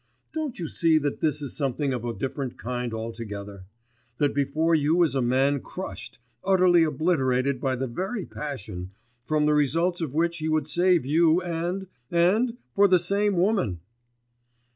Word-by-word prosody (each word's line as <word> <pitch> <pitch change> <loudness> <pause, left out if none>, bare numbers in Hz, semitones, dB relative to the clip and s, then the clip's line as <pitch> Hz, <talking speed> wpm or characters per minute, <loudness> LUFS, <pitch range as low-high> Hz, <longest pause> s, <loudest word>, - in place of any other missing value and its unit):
Don't 310 -5 -3
you 170 - -4
see 165 +1 +3
that 145 -2 -1
this 150 -1 0
is 140 - -5
something 140 -1 -1
of 120 -2 -4
a 120 - -2
different 135 +1 -4
kind 125 0 -3
altogether, 105 -4 -6 0.5
that 145 -1 +1
before 145 +4 +1
you 160 +3 +3
is 160 - +1
a 135 - +1
man 135 +3 +2
crushed, - - -8 0.3
utterly 185 -2 +4
obliterated 140 -4 +1
by 130 -1 0
the 130 +1 -2
very 185 - -4
passion, 100 -10 -6 0.3
from 155 -1 +1
the 150 - +3
results 165 +5 +1
of 150 -4 -4
which 170 +1 +1
he 155 0 -2
would 155 -2 +1
save 175 -2 +2
you, 160 +4 +4
and... 175 +2 -3 0.2
and 210 +8 +2 0.2
for 200 0 +5
the 185 -1 +5
same 200 +3 +1
woman! 180 - +1
155 Hz, 165 wpm, -26 LUFS, 130-175 Hz, 0.5 s, for